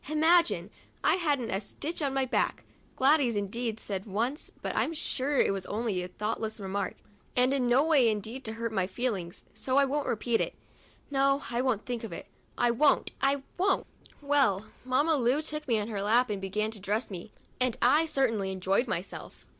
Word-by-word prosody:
Imagine! 310 Hz, -, +3 dB, 0.3 s
I -, -, +4 dB
hadn't 290 Hz, -10 st, 0 dB
a 195 Hz, -, -1 dB
stitch 295 Hz, +10 st, -5 dB
to 290 Hz, -3 st, +1 dB
my 270 Hz, 0 st, 0 dB
back. 255 Hz, -, 0 dB, 0.3 s
Gladys, 270 Hz, -3 st, +4 dB
indeed, 220 Hz, +3 st, -2 dB
said 195 Hz, -1 st, -4 dB
once 235 Hz, +9 st, 0 dB
— -, -, -29 dB
but -, -, -3 dB
I'm 330 Hz, -, 0 dB
sure 285 Hz, -1 st, -1 dB
it -, -, +3 dB
was 195 Hz, -2 st, -5 dB
only 210 Hz, -3 st, -1 dB
a 180 Hz, -, -4 dB
thoughtless 215 Hz, +3 st, -3 dB
remark, 195 Hz, 0 st, -3 dB, 0.4 s
and 250 Hz, +2 st, +3 dB
in 255 Hz, -3 st, +1 dB
no 255 Hz, +4 st, +5 dB
way 295 Hz, -7 st, +4 dB
intended 220 Hz, +5 st, -3 dB
to 220 Hz, -, -4 dB
hurt 230 Hz, 0 st, -3 dB
my 190 Hz, -4 st, 0 dB
feelings, 195 Hz, -6 st, -3 dB
so 260 Hz, 0 st, -1 dB
I 280 Hz, -, +6 dB
won't 285 Hz, +2 st, -1 dB
repeat 230 Hz, +1 st, +1 dB
it. -, -, -2 dB, 0.6 s
No, 275 Hz, 0 st, +2 dB
I 240 Hz, +1 st, +1 dB
won't 250 Hz, -5 st, 0 dB
think 245 Hz, -2 st, -3 dB
of 225 Hz, -, -6 dB
it; 165 Hz, -, -7 dB, 0.3 s
I 240 Hz, -, +3 dB
won't, 280 Hz, +5 st, +3 dB
I 275 Hz, 0 st, +2 dB, 0.2 s
won't! 385 Hz, +1 st, +2 dB, 0.4 s
Well, 270 Hz, -9 st, +2 dB, 0.2 s
Mamma 285 Hz, +5 st, +3 dB
Lu 250 Hz, +2 st, +2 dB
took 300 Hz, -1 st, -4 dB
me 230 Hz, -3 st, +2 dB
on 205 Hz, -, -3 dB
her 205 Hz, -3 st, -3 dB
lap 230 Hz, +3 st, +3 dB
and 200 Hz, -2 st, -3 dB
began 210 Hz, +3 st, -1 dB
to 220 Hz, -, -6 dB
dress 210 Hz, +4 st, -2 dB
me, 185 Hz, +3 st, -7 dB, 0.3 s
and 255 Hz, -2 st, +1 dB
I 300 Hz, +7 st, +4 dB
certainly 225 Hz, -10 st, +1 dB
enjoyed 190 Hz, +6 st, +1 dB
myself. 190 Hz, -3 st, -5 dB
240 Hz, 195 wpm, -29 LUFS, 210-275 Hz, 0.6 s, I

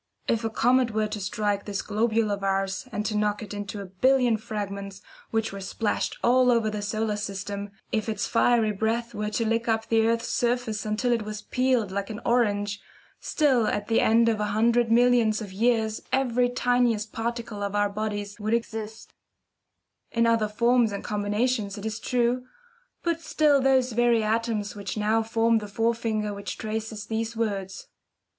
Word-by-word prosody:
If 230 Hz, 0 st, +1 dB
a 225 Hz, -, 0 dB
comet 245 Hz, 0 st, +2 dB
were 215 Hz, 0 st, +2 dB
to 210 Hz, 0 st, -4 dB
strike 200 Hz, +1 st, -1 dB
this 200 Hz, -2 st, -3 dB
globule 220 Hz, 0 st, +1 dB
of 200 Hz, -1 st, -3 dB
ours, 195 Hz, +4 st, -1 dB
and 210 Hz, -, -3 dB
to 215 Hz, -, -1 dB
knock 210 Hz, +1 st, 0 dB
it 210 Hz, -, -8 dB
into 205 Hz, 0 st, -5 dB
a -, -, -6 dB
billion 245 Hz, +5 st, +3 dB
fragments, 200 Hz, -2 st, -5 dB, 0.3 s
which 225 Hz, -2 st, -1 dB
were 195 Hz, -, -6 dB
splashed 205 Hz, +3 st, -2 dB
all 250 Hz, +1 st, +4 dB
over 230 Hz, -3 st, +2 dB
the 210 Hz, -1 st, -4 dB
solar 215 Hz, +1 st, -1 dB
system 200 Hz, 0 st, -4 dB, 0.2 s
if 220 Hz, +1 st, -1 dB
its 215 Hz, 0 st, -1 dB
fiery 230 Hz, -2 st, +3 dB
breath 225 Hz, +3 st, -1 dB
were 210 Hz, -1 st, -2 dB
to 225 Hz, +2 st, -1 dB
lick 230 Hz, +1 st, 0 dB
up 225 Hz, -1 st, +1 dB
the 225 Hz, -1 st, +3 dB
earth's 230 Hz, 0 st, 0 dB
surface 235 Hz, -3 st, -1 dB
until 220 Hz, +4 st, 0 dB
it 235 Hz, -2 st, +2 dB
was 210 Hz, 0 st, -6 dB
peeled 250 Hz, -5 st, +1 dB
like 200 Hz, 0 st, -3 dB
an 215 Hz, 0 st, -5 dB
orange, 205 Hz, -4 st, +1 dB, 0.4 s
still 260 Hz, -8 st, +2 dB
at 205 Hz, +1 st, -2 dB
the 225 Hz, -, +3 dB
end 230 Hz, +1 st, +4 dB
of 225 Hz, -2 st, +1 dB
a 210 Hz, -, 0 dB
hundred 230 Hz, +3 st, +2 dB
millions 235 Hz, -2 st, +4 dB
of 205 Hz, -4 st, -7 dB
years 220 Hz, 0 st, +1 dB
every 250 Hz, -2 st, +2 dB
tiniest 245 Hz, -3 st, +1 dB
particle 230 Hz, -2 st, -4 dB
of 200 Hz, 0 st, -2 dB
our 205 Hz, 0 st, +3 dB
bodies 205 Hz, 0 st, -4 dB
would 215 Hz, +2 st, +1 dB
exist 225 Hz, -1 st, -5 dB, 1.0 s
in 230 Hz, 0 st, +1 dB
other 230 Hz, -2 st, +3 dB
forms 235 Hz, +1 st, +2 dB
and 200 Hz, -, -5 dB
combinations, 210 Hz, +1 st, -1 dB
it 205 Hz, -, -7 dB
is 220 Hz, 0 st, -3 dB
true, 250 Hz, 0 st, 0 dB, 0.6 s
but 335 Hz, -1 st, -1 dB
still 300 Hz, -3 st, +3 dB
those 260 Hz, -1 st, +3 dB
very 235 Hz, -1 st, +3 dB
atoms 220 Hz, -1 st, -1 dB
which 200 Hz, 0 st, -5 dB
now 215 Hz, +2 st, +2 dB
form 225 Hz, 0 st, +2 dB
the 210 Hz, -, -7 dB
forefinger 220 Hz, 0 st, -1 dB
which 200 Hz, 0 st, -6 dB
traces 220 Hz, -1 st, -4 dB
these 225 Hz, +1 st, -3 dB
words. 195 Hz, -4 st, -3 dB
220 Hz, 180 wpm, -26 LUFS, 205-235 Hz, 1.0 s, all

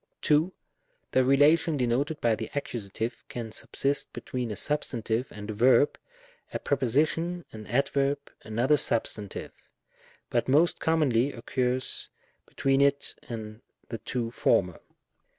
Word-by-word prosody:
2. 155 Hz, +4 st, +3 dB, 0.6 s
The 130 Hz, -, +4 dB
relation 150 Hz, +4 st, +4 dB
denoted 135 Hz, +5 st, 0 dB
by 115 Hz, -1 st, +3 dB
the 110 Hz, 0 st, -4 dB
Accus. 120 Hz, -7 st, -4 dB, 0.4 s
can 115 Hz, -2 st, -5 dB
subsist 140 Hz, +5 st, -1 dB
between 125 Hz, -2 st, -4 dB
a 105 Hz, -, -3 dB
substantive 120 Hz, -4 st, -1 dB
and 105 Hz, +1 st, -6 dB
a -, -, -4 dB
verb 125 Hz, +5 st, +4 dB, 0.3 s
— -, -, -30 dB
a -, -, -2 dB
preposition, 155 Hz, +7 st, 0 dB
an 110 Hz, -1 st, -9 dB
adverb, 140 Hz, +2 st, +1 dB, 0.2 s
another 120 Hz, +7 st, +2 dB
substantive; 110 Hz, -5 st, 0 dB, 0.8 s
but 120 Hz, -, +1 dB
most 165 Hz, +6 st, +3 dB
commonly 145 Hz, -5 st, +2 dB
occurs 125 Hz, +1 st, -2 dB, 0.4 s
between 135 Hz, 0 st, +1 dB
it 140 Hz, 0 st, +2 dB, 0.2 s
and 110 Hz, -1 st, -6 dB, 0.3 s
the 115 Hz, -, -5 dB
two 120 Hz, -2 st, -3 dB
former. 90 Hz, -6 st, +1 dB
130 Hz, 125 wpm, -28 LUFS, 115-145 Hz, 0.8 s, The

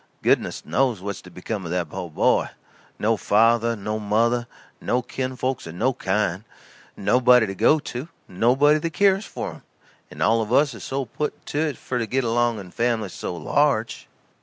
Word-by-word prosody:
Goodness -, -, +1 dB
knows 125 Hz, -6 st, +1 dB
what's 100 Hz, +1 st, -5 dB
to 90 Hz, -, -13 dB
become 95 Hz, +3 st, -5 dB
o' 85 Hz, -, -6 dB
that 90 Hz, -1 st, -1 dB
po' 90 Hz, -2 st, -5 dB
boy. 75 Hz, -, +2 dB, 0.5 s
No 110 Hz, +1 st, +1 dB
father, 115 Hz, +3 st, +3 dB
no 105 Hz, +1 st, -3 dB
mother, 115 Hz, +3 st, +1 dB, 0.3 s
no 125 Hz, +1 st, 0 dB
kin 130 Hz, +1 st, -4 dB
folks 130 Hz, -5 st, -3 dB
of 80 Hz, -, -8 dB
no 125 Hz, +8 st, +1 dB
kind. 95 Hz, -3 st, -1 dB, 0.5 s
Nobody 125 Hz, +3 st, +4 dB
to 95 Hz, -, -4 dB
go 150 Hz, -, +4 dB
to, 140 Hz, -2 st, -6 dB, 0.2 s
nobody 135 Hz, +10 st, +3 dB
that 165 Hz, +1 st, -3 dB
k'yers 195 Hz, +2 st, +3 dB
for -, -, -5 dB
him -, -, -13 dB, 0.5 s
and -, -, -4 dB
all 115 Hz, +1 st, +3 dB
of 110 Hz, -, -4 dB
us 145 Hz, -2 st, +3 dB
is 115 Hz, -, -10 dB
so 135 Hz, 0 st, -3 dB
put 150 Hz, +6 st, -5 dB
to 145 Hz, -, -3 dB
it 155 Hz, -2 st, -1 dB
for 125 Hz, -, -3 dB
to 115 Hz, -, -2 dB
get 130 Hz, +4 st, 0 dB
along 120 Hz, 0 st, +1 dB
and 90 Hz, -3 st, -10 dB
families 115 Hz, -5 st, -1 dB
so -, -, -5 dB
large." 115 Hz, -, 0 dB
115 Hz, 185 wpm, -23 LUFS, 105-130 Hz, 0.5 s, Nobody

